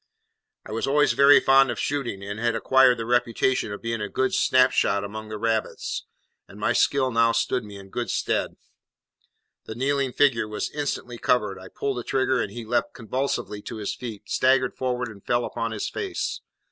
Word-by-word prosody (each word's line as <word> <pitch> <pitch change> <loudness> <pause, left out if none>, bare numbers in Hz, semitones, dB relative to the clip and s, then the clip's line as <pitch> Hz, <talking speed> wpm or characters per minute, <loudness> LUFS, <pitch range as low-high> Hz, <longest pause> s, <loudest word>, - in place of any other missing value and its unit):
I - - -9
was 115 +4 -2
always 145 +2 +3
very 140 +1 +7
fond 135 0 +5
of 120 - -3
shooting, 125 -9 -2
and 100 +2 -6
had 115 0 0
acquired 130 +1 +4
the 115 - -4
reputation 120 -1 +1
of 100 - -7
being 115 -1 -2
a 105 - -3
good 130 0 0
snap 130 0 +4
shot 100 0 +1
among 110 +2 -7
the 110 - -5
rabbits, 110 0 -2 0.4
and - - -13
my - - +1
skill 130 -2 +2
now 115 0 +3
stood 115 +2 0
me 105 -1 -10
in 95 0 -12
good 120 -1 -3
stead. - - -1 1.1
The 110 - -7
kneeling 135 +1 0
figure 125 -5 +2
was 105 0 -4
instantly 135 -5 -4
covered; 105 -6 +1
I 95 - -11
pulled 135 +6 -3
the - - -5
trigger, 130 +1 +1
and - - -3
he 120 -1 -7
leapt 120 +2 -1
convulsively 120 -3 -3
to 115 - -7
his 105 -2 -3
feet, 115 -5 -8
staggered 130 0 +2
forward, 125 -1 -2
and 100 -3 -12
fell 120 0 0
upon 115 -1 -3
his 105 -2 -3
face. 390 -3 -4
120 Hz, 195 wpm, -25 LUFS, 110-130 Hz, 1.1 s, very